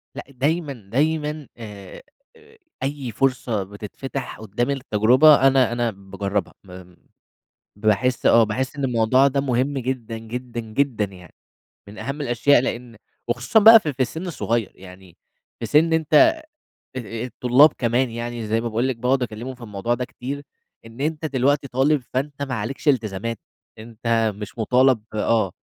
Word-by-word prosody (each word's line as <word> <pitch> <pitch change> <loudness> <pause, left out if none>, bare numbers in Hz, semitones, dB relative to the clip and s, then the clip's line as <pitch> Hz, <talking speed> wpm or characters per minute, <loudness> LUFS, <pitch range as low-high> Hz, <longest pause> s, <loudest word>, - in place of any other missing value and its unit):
لأ، - - -6
دايمًا، 145 +3 -1 0.2
دايمًا، 150 +1 -1
آآ، 105 -4 -10 0.3
آآ، 450 0 -21 0.3
أي 135 -3 -3
فرصة 120 -4 0
بتتفتح 105 +7 -7
قدّامي 115 +6 -2
التجربة 130 +4 +5
أنا 130 -3 +3
أنا 120 -1 -1
باجرّبها، 100 +1 -4
مام 90 -1 -13 0.8
باحس 110 +4 +1
آه 115 -1 +6
باحس 130 +6 -3
إن 140 - -3
الموضوع 125 +2 +3
ده 140 0 0
مهم 135 +1 0
جدًا، 120 -3 -4
جدًا، 120 +1 -6
جدًا، 110 0 -1
يعني 90 -3 -12 0.5
من 105 - -12
أهَم 140 +7 -5
الأشياء، 125 +1 +3
لإن 120 -2 -5 0.3
وخصوصًا 125 - +2
بقى 225 +1 +9
في 150 -5 -3
في 130 - -16
السن 160 +8 -4
الصغيّر 115 - -2
يعني 90 -1 -15 0.4
في - - -3
سن 160 +2 +3
أنت 160 -2 0
آآ، 325 0 +6 0.6
آآ، 115 -1 -5
الطلاب 125 +4 +4
كمان 120 +1 +1
يعني 120 -1 -5
زي 110 +1 0
ما 120 - -3
باقول 115 +3 -1
لِك 130 - -1
باقعُد 125 +2 +1
اكلمهم 120 +3 -6
في 120 - -20
الموضوع 110 +1 -3
ده 125 +1 -2
كتير، 140 +4 -7 0.4
إن 115 +4 -11
أنت 155 +1 -2
دلوقتي 140 0 +1
طالب 135 +3 +1
فأنت 140 +2 -3
ما 135 -3 -2
عليكش 115 +8 -5
إلتزامات، 115 -4 0 0.4
أنت 115 0 -1
مش 105 +2 -9
مطالب 125 0 +3
آه، 110 -3 +1
125 Hz, 155 wpm, -22 LUFS, 110-140 Hz, 0.8 s, بقى